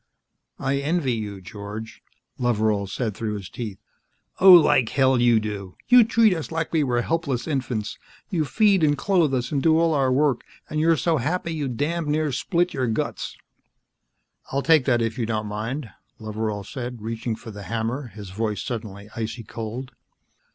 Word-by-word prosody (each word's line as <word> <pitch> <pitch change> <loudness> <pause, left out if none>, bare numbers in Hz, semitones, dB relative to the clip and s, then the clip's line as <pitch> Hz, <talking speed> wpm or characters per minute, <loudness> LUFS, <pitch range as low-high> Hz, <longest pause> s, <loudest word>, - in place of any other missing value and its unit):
"I 140 0 0
envy 145 -2 0
you, 105 -4 -5
George," 105 +3 -8 0.4
Loveral 110 -4 +1
said 110 +1 -2
through 105 +1 -3
his 100 -3 -7
teeth. 110 -5 -5 0.6
"Oh, 190 0 +9
like 150 -8 +6
hell 130 -2 +3
you 120 -2 +5
do. 100 -3 -5
You 245 -1 +9
treat 225 -2 +4
us 165 -2 -5
like 165 0 -2
we 160 -2 +3
were 120 -3 +1
helpless 140 -6 -1
infants. 125 -7 -2 0.3
You 170 -5 +1
feed 195 +3 +3
and 145 -1 +3
clothe 175 -4 +2
us 125 -2 -1
and 140 -2 0
do 160 +1 +4
all 165 -1 +3
our 135 -3 +2
work, 140 -1 +2 0.2
and 155 - -2
you're 165 +1 +4
so 165 +1 +1
happy 165 +6 -1
you 150 -3 -2
damned 150 +6 -2
near 150 0 +1
split 175 +6 0
your 130 -3 0
guts." 110 - -3 1.1
"I'll 140 +1 0
take 160 -5 +5
that, 120 -3 +2
if 115 +2 -2
you 115 - -1
don't 110 -2 -1
mind," 110 +4 -4 0.3
Loveral 110 -1 -3
said, 120 -1 -6
reaching 115 +1 -3
for 115 0 -10
the 105 -1 -9
hammer, 115 +4 -2
his 105 -4 -10
voice 105 0 -2
suddenly 105 -4 -6
icy 115 +1 -4
cold. 115 +4 -6
125 Hz, 175 wpm, -24 LUFS, 110-155 Hz, 1.1 s, Oh